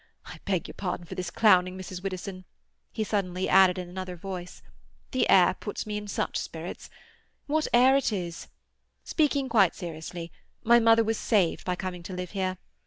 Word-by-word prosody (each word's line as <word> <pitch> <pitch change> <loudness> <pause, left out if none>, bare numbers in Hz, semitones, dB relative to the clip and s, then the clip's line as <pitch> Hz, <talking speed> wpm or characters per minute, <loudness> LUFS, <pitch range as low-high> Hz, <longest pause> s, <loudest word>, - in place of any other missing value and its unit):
—I - - -10
beg 190 -4 -1
your - - -9
pardon 180 -3 -4
for - - -8
this 180 -1 -4
clowning, 185 -3 +4
Mrs. 185 -1 -7
Widdowson," 185 -1 -5 0.5
he 220 - -2
suddenly 190 -3 -1
added 190 -1 +5
in 180 -1 -5
another 185 0 -6
voice. 180 0 -7 0.5
"The - - +1
air - - +6
puts - - -6
me 210 -1 -4
in 210 0 -5
such - - -2
spirits. - - -7 0.6
What 310 +1 0
air 255 +3 +6
it 275 -4 +2
is! 175 -5 -4 0.6
Speaking 285 -4 +1
quite 205 -7 +4
seriously, 170 0 -7 0.3
my 235 +1 +6
mother 230 0 +5
was 225 0 -1
saved 195 -7 +1
by 180 - 0
coming 180 -1 -5
to 180 +2 -8
live 180 -1 -5
here. 185 -2 -2
185 Hz, 175 wpm, -27 LUFS, 180-215 Hz, 0.6 s, air